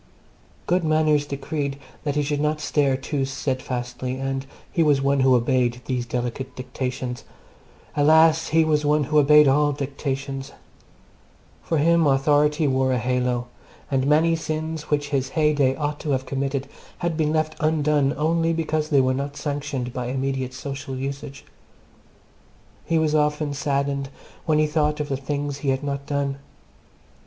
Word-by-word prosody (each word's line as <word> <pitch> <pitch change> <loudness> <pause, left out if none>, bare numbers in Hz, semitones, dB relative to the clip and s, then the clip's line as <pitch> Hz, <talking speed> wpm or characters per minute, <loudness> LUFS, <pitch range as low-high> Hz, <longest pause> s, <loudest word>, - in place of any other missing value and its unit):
Good 180 0 +1
manners 155 -2 +2
decreed 140 0 -3 0.3
that 145 -1 -1
he 150 - +1
should 145 0 -1
not 150 0 0
stare 140 -3 +1
too 135 +1 -2
steadfastly, 130 -2 -3
and 135 0 -3 0.2
he 170 - +1
was 150 -3 +4
one 140 0 +2
who 130 -1 +5
obeyed 125 0 +1
these 125 -2 -2
delicate 125 +2 -4
dictations. 125 -1 -4 0.7
Alas! 160 +2 +5
he 160 +1 +3
was 150 -1 +2
one 150 0 +3
who 150 +2 +3
obeyed 150 +1 +6
all 145 +2 +3
dictates. 135 -1 -4 1.1
For 165 - -1
him 165 +1 +4
authority 150 +2 +3
wore 130 -1 +2
a - - +1
halo, 125 0 0 0.5
and 135 0 +1
many 160 +3 +4
sins 155 -1 -4
which 145 -1 0
his 135 -2 -1
heyday 145 -4 +3
ought 145 0 -3
to 150 - -5
have 130 0 -1
committed 135 0 -2 0.3
had 170 -2 -2
been 155 -1 +1
left 155 0 0
undone 150 -2 +2
only 165 +2 +1
because 155 -1 -1
they 140 -3 +4
were 130 0 +2
not 140 +2 -4
sanctioned 140 -4 -3
by 125 -1 -3
immediate 130 0 -2
social 135 0 -6
usage. 140 +1 -6 1.4
He 165 - +1
was 155 -1 +1
often 150 -1 +1
saddened 140 -1 -1 0.4
when 155 -1 +3
he 155 - +4
thought 150 0 0
of 150 0 -3
the 135 - 0
things 145 +1 -3
he 140 - -2
had 130 +1 0
not 140 -1 -4
done. 140 -1 -1
140 Hz, 155 wpm, -23 LUFS, 135-150 Hz, 1.4 s, obeyed